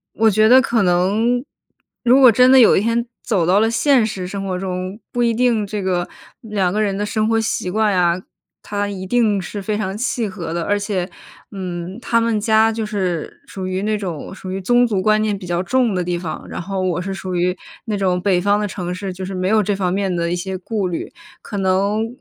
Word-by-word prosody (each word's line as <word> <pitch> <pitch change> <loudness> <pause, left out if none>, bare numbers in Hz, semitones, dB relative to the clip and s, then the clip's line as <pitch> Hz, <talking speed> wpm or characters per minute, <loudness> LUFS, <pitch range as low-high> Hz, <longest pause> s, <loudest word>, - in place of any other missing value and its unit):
我 225 0 +4
觉 215 +2 +4
得 260 +1 +8
可 235 -4 +1
能， 205 +8 +2 0.6
如 245 +3 +5
果 255 -3 +8
真 250 +4 +5
的 265 - +8
有 235 - +7
一 - - +3
天 230 +2 0 0.2
走 185 -7 +1
到 190 +4 +4
了 225 +1 +2
现 250 0 +3
实 185 -4 -4
生 195 +1 -5
活 185 -1 -2
中， 185 +2 -4
不 240 0 +1
一 230 -1 +2
定 235 -3 +1
这 205 0 -4
个 180 -2 -1 0.3
2 200 -5 -1
个 215 - 0
人 200 -2 0
的 205 - -1
生 215 +1 0
活 225 0 +2
习 220 -4 -2
惯 215 +1 +1
呀， 175 -1 +2 0.4
它 205 0 -2
一 190 -2 -5
定 215 -1 +2
是 200 +2 -6
非 210 +2 -2
常 195 -2 -3
契 230 0 -1
合 170 -4 -6
的。 170 0 -2
而 205 +4 0
且， 200 -3 -2 0.4
嗯， 185 0 -6
他 230 -1 +2
们 230 -2 +1
家 220 +1 +3
就 225 0 -3
是 185 -6 -3
属 190 -1 -6
于 185 +1 -2
那 215 0 0
种 185 -4 -5
属 185 -1 -8
于 190 - -3
宗 245 +5 +3
族 200 -4 0
观 215 +2 +3
念 210 -2 0
比 185 - -9
较 175 0 -1
重 245 +1 +1
的 180 - -1
地 175 0 -2
方， 165 -3 -6
然 - - -5
后 190 +1 -3
我 180 -2 0
是 195 +2 -4
属 185 -1 -5
于 180 +1 +1 0.3
那 215 -3 -2
种 185 -2 +1
北 180 -1 +1
方 205 +2 +2
的 210 - -1
城 180 -2 -4
市， 190 0 -5
就 185 +1 -7
是 190 +1 -5
没 185 0 -1
有 215 +2 +3
这 205 0 0
方 185 -2 -1
面 195 -1 -1
的 170 0 -1
一 - - +1
些 190 +1 -4
顾 195 +1 -2
虑。 170 - -5 0.3
可 205 - -6
能 200 +3 +1
200 Hz, 250 characters per minute, -19 LUFS, 185-220 Hz, 0.6 s, 得